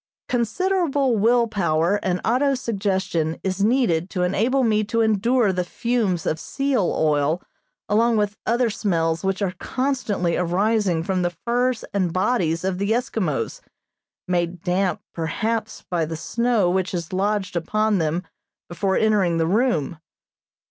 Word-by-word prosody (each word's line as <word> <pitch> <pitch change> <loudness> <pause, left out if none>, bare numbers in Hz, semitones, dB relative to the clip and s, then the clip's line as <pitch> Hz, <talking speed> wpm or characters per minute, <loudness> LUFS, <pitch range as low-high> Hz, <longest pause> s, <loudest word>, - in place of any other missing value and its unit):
Considerable 280 - +1
will 235 +3 +3
power 175 -2 +1
and 180 -1 0
auto 270 +4 +2
suggestion 195 -8 -1
is 190 +1 -1
needed 205 -8 +2
to 180 -1 -1
enable 235 +9 +1
me 215 -2 +2
to 230 +2 0
endure 220 0 +2
the 180 0 0
fumes 205 -3 -1
of 155 - -1
seal 270 - 0
oil 150 +1 +2 0.5
along 230 +2 +3
with 210 -1 0
other 235 0 +2
smells 165 -6 0
which 195 +1 -1
are 185 -2 -1
constantly 250 -10 -1
arising 185 -1 +1
from 185 0 -1
the 175 -1 -1
furs 245 0 +1
and 185 -4 +1
bodies 185 -4 +1
of 185 -1 -1
the 200 +1 -1
Eskimos, 220 - -1 0.7
made 175 -1 -1
damp, 180 -1 0
perhaps, 220 +7 -2
by 175 -2 0
the 160 +1 -4
snow 235 +2 +1
which 185 +2 0
has 170 -1 -4
lodged 200 0 -1
upon 215 +4 +1
them 165 +2 -1 0.5
before 190 +2 0
entering 200 -6 +2
the 165 - +2
room. 175 - 0
195 Hz, 140 wpm, -23 LUFS, 175-230 Hz, 0.7 s, will